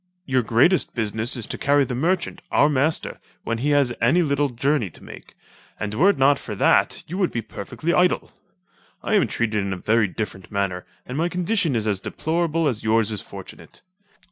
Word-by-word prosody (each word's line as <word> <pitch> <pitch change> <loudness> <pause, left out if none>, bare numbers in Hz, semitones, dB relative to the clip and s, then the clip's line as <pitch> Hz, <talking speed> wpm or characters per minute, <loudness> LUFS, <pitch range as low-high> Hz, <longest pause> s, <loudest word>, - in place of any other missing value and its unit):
Your 130 -2 +2
greatest 120 - +2
business 110 +2 -2
is 115 - -5
to - - -6
carry 145 0 +3
the 125 - -4
merchant, 175 +7 -1
our 145 - +4
master, 150 +2 0 0.2
when 115 0 -2
he 140 +5 0
has 140 -4 +3
any 160 +10 +4
little 145 -1 +1
journey 130 -2 0
to - - -17
make, - - -12 0.4
and 105 -1 -3
were 170 - +4
it 200 - +2
not 135 +1 +4
for 105 - -6
that - - +2
you 180 +5 -5
would 185 - +1
be 115 - -3
perfectly 135 - -4
idle. 180 0 +2 0.7
I - - -1
am 205 -4 +4
treated 110 -3 -1
in 95 -1 -2
a - - -5
very 110 +3 +2
different 95 -1 -6
manner, 100 -3 -2 0.2
and 130 +4 -4
my 170 +2 +1
condition 180 - 0
is 110 -2 -1
as 105 -3 0
deplorable 165 - -1
as 120 -6 -1
yours 110 0 +2
is 105 - -1
fortunate. - - -12
130 Hz, 195 wpm, -23 LUFS, 110-160 Hz, 0.7 s, our